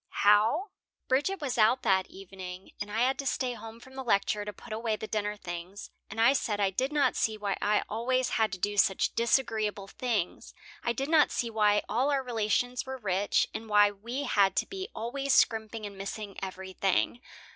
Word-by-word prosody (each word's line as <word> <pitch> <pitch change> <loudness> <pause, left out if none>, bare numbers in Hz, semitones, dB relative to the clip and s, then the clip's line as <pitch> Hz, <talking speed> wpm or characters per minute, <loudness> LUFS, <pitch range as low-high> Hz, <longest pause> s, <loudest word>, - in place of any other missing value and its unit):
"How?" 220 - +4 0.4
"Bridget 295 +9 +1
was 260 -5 -2
out 225 +4 +4
that 190 -1 +2
evening, 190 -1 -9
and 205 - -4
I 220 +2 0
had 260 +2 +2
to 275 - -2
stay 255 -2 0
home 225 -1 -10
from 260 +2 -15
the 265 0 -5
lecture 205 -2 +1
to 210 - -5
put 215 +3 -10
away 220 0 -1
the 215 - -6
dinner 210 -1 -2
things 175 +1 -7 0.2
and 215 - -7
I 235 +4 +6
said 220 -6 -1
I 195 -1 +2
did 260 +8 -1
not 295 -2 +2
see 220 -1 0
why 205 -2 -1
I 210 +1 +2
always 255 +3 0
had 220 -2 +1
to - - -3
do 205 +3 -2
such 195 -1 +3
disagreeable 220 -4 +1
things. 215 -5 -3 0.3
I 235 - 0
did 270 +4 -2
not 315 -2 +5
see 235 -1 -2
why 210 -1 +3
all 255 +6 +1
our 275 -2 +1
relations 245 +1 0
were 265 0 -6
rich, 200 -3 +1
and 225 0 -6
why 205 -1 +5
we 235 +7 -5
had 200 -7 +3
to - - +1
be 385 0 -6
always 270 +4 0
scrimping 220 -1 +2
and 200 -1 -7
missing 200 0 -6
everything. 190 +4 -1
220 Hz, 200 wpm, -29 LUFS, 205-255 Hz, 0.4 s, I